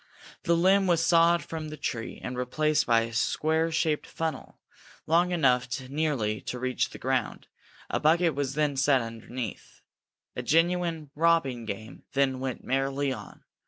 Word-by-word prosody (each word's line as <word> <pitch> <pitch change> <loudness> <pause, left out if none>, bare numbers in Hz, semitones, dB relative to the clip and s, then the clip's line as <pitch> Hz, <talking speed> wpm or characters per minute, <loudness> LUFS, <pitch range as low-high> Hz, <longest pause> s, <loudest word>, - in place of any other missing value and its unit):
The 170 0 +3
limb 190 +3 +4
was 165 -2 +3
sawed 170 -1 +4
from 160 0 -6
the 155 - -8
tree 115 -5 -4
and 125 - -4
replaced 150 +5 0
by 115 -1 +4
a 115 0 -5
square 160 +7 +1
shaped 160 -2 0
funnel, 160 -4 -5 0.5
long 170 +3 +3
enough 130 -8 +2 0.2
nearly 135 -8 -1
to 125 - -5
reach 130 0 -1
the - - -10
ground; - - -2 0.4
a - - -1
bucket 165 +2 +3
was 135 -1 -2
then 150 -2 0
set 135 0 +3
underneath. 115 0 -7 0.5
A - - -3
genuine 165 +2 +1
robbing 150 -7 +2
game 110 +3 -7
then 135 -1 +1
went 130 -2 -4
merrily 135 +1 0
on. - - -11
145 Hz, 155 wpm, -27 LUFS, 125-165 Hz, 0.5 s, limb